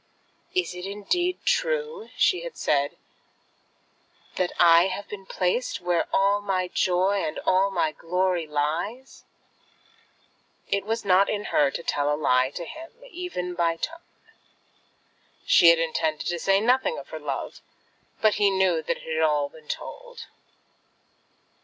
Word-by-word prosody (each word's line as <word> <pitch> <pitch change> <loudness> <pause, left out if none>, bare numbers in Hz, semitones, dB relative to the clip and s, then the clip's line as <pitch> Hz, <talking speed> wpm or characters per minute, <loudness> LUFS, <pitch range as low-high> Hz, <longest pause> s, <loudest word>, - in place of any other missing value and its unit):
"Is 370 - 0
it 180 +1 -6
indeed 350 - -2
true," 470 -2 -1
she 365 - +3
had - - -8
said, 140 -1 0 1.4
"that 180 -1 0
I 170 +1 +7
have 195 +2 -5
been 195 -2 -9
placed 190 +7 -1
there 180 -3 -16
where 175 -1 +1
all 200 +1 +2
my 185 -3 -1
joy 190 +2 +1
and 155 -1 -3
all 190 +1 +3
my 175 -5 0
glory 180 0 -1
lies?" 165 - -3 1.4
It 200 0 -1
was 225 0 -2
not 190 +1 +4
in 210 -1 -2
her 145 - +4
to 170 - -6
tell 145 -2 0
a 150 - 0
lie 130 -3 +2
to 170 +4 -7
him, 325 - -9 0.2
even 335 - -4
by 170 -1 +1
a - - -14
tone. 330 - -5 1.5
She 170 - +7
had 170 - +6
intended 160 -1 -1
to 175 -1 -2
say 195 +3 +3
nothing 255 - +2
of - - -9
her - - -6
love, - - -5 0.6
but 215 -1 +4
he 200 - +5
knew 190 -4 +2
that - - -2
it - - -14
had 160 0 -2
all 150 -2 +2
been 155 0 -17
told. - - -7
185 Hz, 155 wpm, -25 LUFS, 165-215 Hz, 1.5 s, I